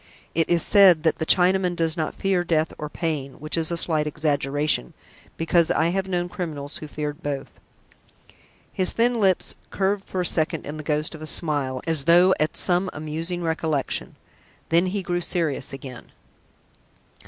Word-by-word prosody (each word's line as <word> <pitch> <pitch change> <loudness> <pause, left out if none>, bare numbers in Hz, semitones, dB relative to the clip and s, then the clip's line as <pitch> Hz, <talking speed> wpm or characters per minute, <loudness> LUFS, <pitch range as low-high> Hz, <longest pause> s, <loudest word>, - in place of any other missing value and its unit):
It 165 0 +1
is 170 -2 +4
said 185 -6 +6
that 160 - +1
the 160 - -2
Chinaman 180 0 +4
does 165 -1 0
not 160 -3 -3
fear 195 -3 0
death 160 -2 0
or 150 - -5
pain, 150 -5 -3
which 155 +3 -3
is 165 -2 0
a 170 - -2
slight 155 -3 +1
exaggeration, 145 - 0 0.4
because 165 0 +2
I 160 +1 +2
have 190 +2 -2
known 175 -2 -1
criminals 155 -5 -6
who 155 - -8
feared 150 +1 -5
both." 145 -3 -4 1.2
His 185 - +1
thin 235 +1 +1
lips 190 -2 +2 0.2
curved 195 0 -1
for 185 - -3
a - - -2
second 160 -1 0
in 150 +1 -6
the 155 - -7
ghost 150 +1 -1
of 155 - -10
a 155 - -4
smile, 145 -6 0
as 160 -4 +1
though 175 +3 +6
at 155 - 0
some 180 +1 +2
amusing 165 +4 -4
recollection. 160 -3 -2 0.5
Then 170 +3 +3
he 195 +1 -3
grew 175 0 -2
serious 160 -7 -2
again. 130 -2 -10
165 Hz, 170 wpm, -23 LUFS, 150-180 Hz, 1.2 s, said